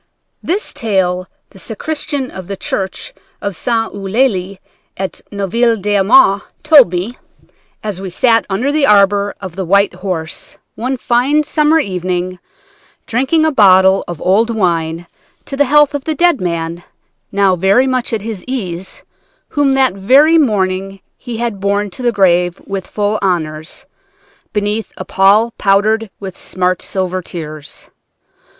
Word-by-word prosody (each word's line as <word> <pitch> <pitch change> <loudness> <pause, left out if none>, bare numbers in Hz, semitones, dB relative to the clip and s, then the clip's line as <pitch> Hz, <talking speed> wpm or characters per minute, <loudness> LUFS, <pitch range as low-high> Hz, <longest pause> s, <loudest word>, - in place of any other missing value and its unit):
This 385 +5 -2
tale 185 -4 -1 0.2
the 195 - -15
sacristan 280 +4 -3
of 185 -2 -9
the 195 0 -5
church 195 - -4 0.3
of 200 -2 -4
St. 225 +3 -1
Eulalie 195 -2 -1 0.4
at 190 0 -4
Neuville 225 +4 +1
d'Aumont 200 - +4 0.2
told 285 - +6
me, 185 +7 -4 0.6
as 205 -3 -4
we 195 - -5
sat 225 +4 +3
under 235 +9 0
the 295 -2 +2
arbor 200 0 +3
of 185 -4 -8
the 190 - -3
White 200 +2 +2
Horse, 180 -3 -4 0.2
one 255 +3 -3
fine 255 +6 +2
summer 300 +1 +2
evening, 185 - -2 0.7
drinking 270 +7 +1
a 315 - +2
bottle 190 -5 +5
of 175 -3 -6
old 210 +5 +3
wine 170 -6 -1 0.4
to 275 - -5
the 285 +1 +3
health 295 +2 +4
of 285 -1 -4
the 315 - -1
dead 345 - +2
man, 170 -1 -3 0.5
now 195 -2 +2
very 195 +8 +3
much 255 -2 -1
at 225 -3 -2
his 220 -4 -5
ease, 190 -8 -5 0.5
whom 285 -2 +1
that 265 -5 +3
very 275 +12 +4
morning 195 -6 0 0.2
he 240 -3 -7
had 230 -4 -3
borne 200 +1 -1
to 255 - -8
the 240 -1 +2
grave 180 -4 +2
with 195 -2 -5
full 210 0 -1
honors, 160 +1 -2 0.7
beneath 210 +1 -2
a 185 - -6
pall 205 +4 +3
powdered 210 +3 +2
with 190 -2 -7
smart 185 -1 -1
silver 185 -1 -2
tears. 155 -4 -8
200 Hz, 145 wpm, -15 LUFS, 185-245 Hz, 0.7 s, told